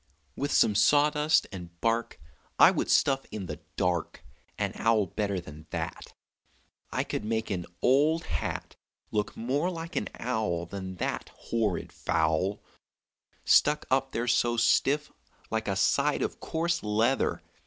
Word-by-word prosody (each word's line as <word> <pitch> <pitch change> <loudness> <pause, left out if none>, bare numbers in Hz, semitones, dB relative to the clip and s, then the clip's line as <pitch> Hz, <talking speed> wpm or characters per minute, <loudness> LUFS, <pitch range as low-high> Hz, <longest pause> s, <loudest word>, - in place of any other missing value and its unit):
"With 145 +1 -2
some 105 - +4
sawdust 150 +8 +4
and 85 -2 -9
bark 115 -4 0 0.4
I - - +8
would - - -2
stuff 135 -1 +3
in 100 -3 -5
the - - -6 0.2
dark 90 -2 -1 0.3
An - - -1
owl 115 -2 +2
better 100 +1 -2
than 75 -2 -11
that; - - -5 0.7
I - - -1
could - - -4
make 110 0 -2
an 90 -3 -3 0.2
old 150 +6 +4
hat 75 -3 -4 0.4
Look 105 -1 -2
more 140 +9 0
like 170 0 -6
an - - -1
owl 110 -9 -1
Than 95 +1 -6
that - - -3
horrid 110 -6 -2
fowl, 80 +5 0 0.8
Stuck 150 0 +4
up 135 0 +2
there 115 +1 -2
so 120 0 +2
stiff 135 +6 +2 0.4
like 110 -1 -1
a 100 - 0
side 95 - +2
of - - -3
coarse 170 +1 -1
leather. 110 +5 +1
110 Hz, 145 wpm, -28 LUFS, 95-135 Hz, 0.8 s, I